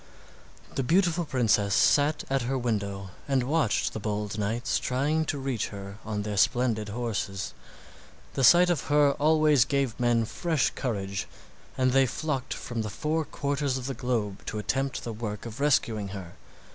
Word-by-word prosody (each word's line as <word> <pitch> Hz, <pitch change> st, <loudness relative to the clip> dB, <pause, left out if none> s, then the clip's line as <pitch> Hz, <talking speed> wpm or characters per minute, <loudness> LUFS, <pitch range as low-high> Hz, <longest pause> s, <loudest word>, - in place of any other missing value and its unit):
The -, -, -1 dB
beautiful 170 Hz, +4 st, +2 dB
princess 105 Hz, -7 st, +2 dB
sat 145 Hz, +1 st, +3 dB
at 135 Hz, 0 st, 0 dB
her 130 Hz, +3 st, -1 dB
window 100 Hz, -5 st, -2 dB, 0.2 s
and 135 Hz, -2 st, +2 dB
watched 145 Hz, -2 st, +1 dB
the -, -, -4 dB
bold 105 Hz, 0 st, -3 dB
knights 110 Hz, +4 st, 0 dB
trying 145 Hz, +5 st, 0 dB
to 150 Hz, -, -2 dB
reach 135 Hz, -5 st, -2 dB
her 100 Hz, 0 st, -8 dB
on 105 Hz, -2 st, -3 dB
their 105 Hz, -1 st, -3 dB
splendid 115 Hz, -1 st, +2 dB
horses. 105 Hz, -3 st, -3 dB, 0.8 s
The 135 Hz, -, -1 dB
sight 175 Hz, +7 st, +7 dB
of 155 Hz, -7 st, -1 dB
her 145 Hz, -1 st, +4 dB
always 155 Hz, -3 st, +5 dB
gave 135 Hz, -3 st, -1 dB
men 120 Hz, -2 st, +2 dB
fresh 160 Hz, +3 st, 0 dB
courage, 100 Hz, -6 st, -3 dB, 0.5 s
and 130 Hz, 0 st, +3 dB
they 135 Hz, 0 st, +4 dB
flocked 135 Hz, 0 st, -3 dB
from 120 Hz, -2 st, -4 dB
the 110 Hz, -, -3 dB
four 155 Hz, +8 st, -1 dB
quarters 140 Hz, -2 st, -1 dB
of 130 Hz, -, -6 dB
the 135 Hz, -, -2 dB
globe 115 Hz, -5 st, -2 dB
to 110 Hz, -, -3 dB
attempt 135 Hz, +5 st, -1 dB
the 115 Hz, -, -4 dB
work 105 Hz, -1 st, -5 dB
of 115 Hz, +1 st, -7 dB
rescuing 115 Hz, -8 st, +1 dB
her. 95 Hz, -3 st, -8 dB
125 Hz, 165 wpm, -27 LUFS, 105-140 Hz, 0.8 s, sight